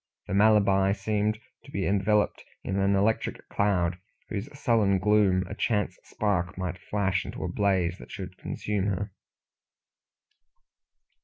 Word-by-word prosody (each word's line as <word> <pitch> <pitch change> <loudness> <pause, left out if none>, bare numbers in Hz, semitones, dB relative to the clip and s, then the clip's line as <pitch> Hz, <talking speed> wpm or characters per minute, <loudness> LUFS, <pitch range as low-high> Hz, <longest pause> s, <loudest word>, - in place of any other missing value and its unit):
The - - -5
Malabar 100 -2 +4
seemed 105 +1 0 0.3
to - - -15
be 100 -8 -2
enveloped 105 +1 +1 0.2
in 95 +1 -1
an 100 0 +3
electric 105 +3 0
cloud, 90 -3 +1 0.3
whose 105 +5 -4
sullen 110 -7 +3
gloom 95 -2 +3
a 100 - -6
chance 105 -1 0
spark 95 -4 -1
might 90 -1 -3
flash 95 -3 0
into - - -6
a - - -1
blaze 95 -4 +1
that - - -12
should - - -7
consume 105 -2 -2
her. 100 +1 -2
100 Hz, 135 wpm, -27 LUFS, 95-105 Hz, 0.3 s, Malabar